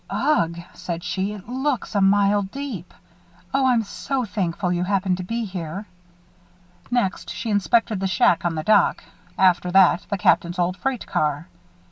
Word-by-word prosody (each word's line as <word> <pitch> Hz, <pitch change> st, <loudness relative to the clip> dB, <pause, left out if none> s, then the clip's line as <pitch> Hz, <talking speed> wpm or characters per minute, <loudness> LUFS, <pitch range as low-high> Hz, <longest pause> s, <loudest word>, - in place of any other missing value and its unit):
"Ugh!" 170 Hz, -, +1 dB
she 170 Hz, -, -8 dB
said, 170 Hz, -1 st, -5 dB
"it 195 Hz, 0 st, -3 dB
looks 260 Hz, 0 st, -2 dB
a 200 Hz, -, +2 dB
mile 200 Hz, +1 st, +4 dB
deep. 200 Hz, -, -6 dB, 0.6 s
Oh, 270 Hz, -1 st, +3 dB
I'm 240 Hz, -3 st, +3 dB
so 260 Hz, +4 st, -3 dB
thankful 180 Hz, -3 st, -2 dB
you 175 Hz, 0 st, 0 dB
happened 185 Hz, -1 st, 0 dB
to 185 Hz, -, -5 dB
be 230 Hz, +5 st, -3 dB
here." 185 Hz, 0 st, -6 dB, 1.0 s
Next, 240 Hz, -6 st, -1 dB
she 230 Hz, -, -4 dB
inspected 210 Hz, +1 st, +2 dB
the 195 Hz, -, 0 dB
shack 175 Hz, -2 st, +3 dB
on 170 Hz, -2 st, -1 dB
the 155 Hz, -, -3 dB
dock; 210 Hz, +1 st, +3 dB, 0.3 s
after 180 Hz, -1 st, +3 dB
that, 185 Hz, -1 st, +4 dB
the 200 Hz, -, -1 dB
Captain's 175 Hz, -1 st, +2 dB
old 180 Hz, +1 st, 0 dB
freight 265 Hz, +2 st, -3 dB
car. 150 Hz, +1 st, -1 dB
195 Hz, 160 wpm, -23 LUFS, 180-225 Hz, 1.0 s, mile